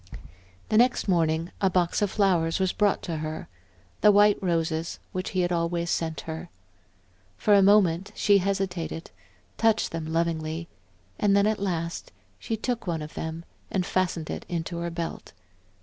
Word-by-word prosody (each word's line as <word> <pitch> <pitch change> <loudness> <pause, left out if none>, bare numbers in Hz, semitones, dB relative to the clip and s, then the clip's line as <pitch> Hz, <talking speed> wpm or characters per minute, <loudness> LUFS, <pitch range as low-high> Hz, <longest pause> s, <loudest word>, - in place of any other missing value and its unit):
The 215 - +4
next 245 -1 +3
morning, 165 -2 +1
a 195 - +4
box 180 +1 +1
of 205 - +2
flowers 180 -5 +2
was 190 -1 +1
brought 205 -2 +1
to 165 -3 -3
her; 155 0 -5 0.5
the 210 - +7
white 205 0 +5
roses 165 -2 -1
which 185 0 -3
he 185 - 0
had 175 0 0
always 170 0 0
sent 160 -1 -1
her. 160 +2 -7 0.9
For 210 - +3
a 200 - +7
moment 195 -2 +4
she 205 -1 +4
hesitated, 185 -4 -2 0.5
touched 225 -1 +2
them 160 -1 -4
lovingly, 165 0 -1 0.5
and 200 -1 +4
then 200 - +4
at 215 0 +1
last 170 -4 -3 0.3
she 225 - -3
took 235 -1 -3
one 165 -3 -1
of 150 - -9
them 160 +1 -5 0.2
and 185 -2 -1
fastened 180 -4 -1
it - - -5
in 170 -2 -2
her 170 0 -3
belt. 170 0 -5
175 Hz, 165 wpm, -26 LUFS, 165-200 Hz, 0.9 s, the